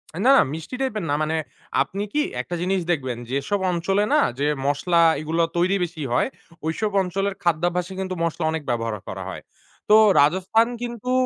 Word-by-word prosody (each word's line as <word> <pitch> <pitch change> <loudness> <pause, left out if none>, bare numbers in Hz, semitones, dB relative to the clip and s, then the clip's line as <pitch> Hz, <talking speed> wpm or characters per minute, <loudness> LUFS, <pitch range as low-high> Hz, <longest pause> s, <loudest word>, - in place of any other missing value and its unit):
অ্যা 170 - -5
না, 270 - +8 0.2
মিষ্টি 160 +10 -6
টাইপ 265 -3 0
এর - - -5
না। - - +1
মানে 155 +1 -1 0.5
আপনি 200 +2 -2
কি 300 - +2 0.2
একটা 175 - -5
জিনিস 190 +2 +1
দেখবেন, 130 -7 -2
যেসব 140 +9 -1
অঞ্চলে 195 +4 +1
না - - +5 0.2
যে 145 - +1 0.2
মসলা 170 +5 +2 0.2
এগুলা 160 +2 0
তৈরি 180 +3 +2
বেশি 165 -2 -5
হয় 125 - +2 0.4
ঐসব 205 +7 -1
অঞ্চলের 195 +2 -2
খাদ্যাভ্যাসে 175 +2 0
কিন্তু 185 -1 -3
মশলা 170 0 -2
অনেক 160 -1 -3
ব্যবহার 115 -2 -1
করা - - -5
হয়। - - -7 0.5
তো 210 - +8 0.3
রাজস্থান 190 +9 +3 0.2
কিন্তু 240 0 -4
175 Hz, 175 wpm, -23 LUFS, 155-195 Hz, 0.5 s, না